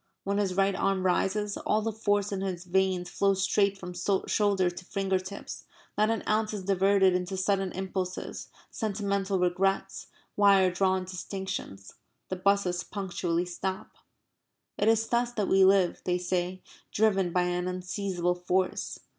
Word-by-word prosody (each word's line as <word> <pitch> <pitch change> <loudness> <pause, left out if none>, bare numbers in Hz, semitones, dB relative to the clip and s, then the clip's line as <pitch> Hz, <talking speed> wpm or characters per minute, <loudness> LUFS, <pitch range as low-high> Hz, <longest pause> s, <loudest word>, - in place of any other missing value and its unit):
When 200 +1 0
his 190 -3 0
right 195 +1 +3
arm 190 -1 0
rises, 200 +3 0
all 215 0 0
the 225 - -1
force 205 -2 0
in 195 -1 -2
his 185 -3 -3
veins 185 0 +1
flows 195 +1 +1
straight 200 0 +2
from 180 -1 -8
shoulder 190 0 +1
to 175 +1 -10
finger 195 0 0
tips; 185 +2 -8 0.3
not 215 +1 +2
an 225 - -1
ounce 215 0 +1
is 195 - -5
diverted 195 0 +3
into 180 +1 -2
sudden 195 0 0
impulses, 185 -1 -4 0.2
sentimental 200 -2 -1
regrets, 185 +2 0 0.3
wire 195 -2 +5
drawn 185 0 +1
distinctions. 185 - -6 0.4
The 185 - -2
buses 185 -2 +1
punctually 175 -3 -2
stop. 185 +2 -4 0.8
It 205 - 0
is 225 0 +3
thus 240 0 0
that 210 -4 -1
we 190 0 +5
live, 190 -2 +4
they 180 -1 +1
say, 180 +1 -2 0.3
driven 195 -4 +2
by 180 +1 +2
an 180 0 -1
unseizable 185 -1 -2
force. 185 +1 0
190 Hz, 150 wpm, -28 LUFS, 180-200 Hz, 0.8 s, wire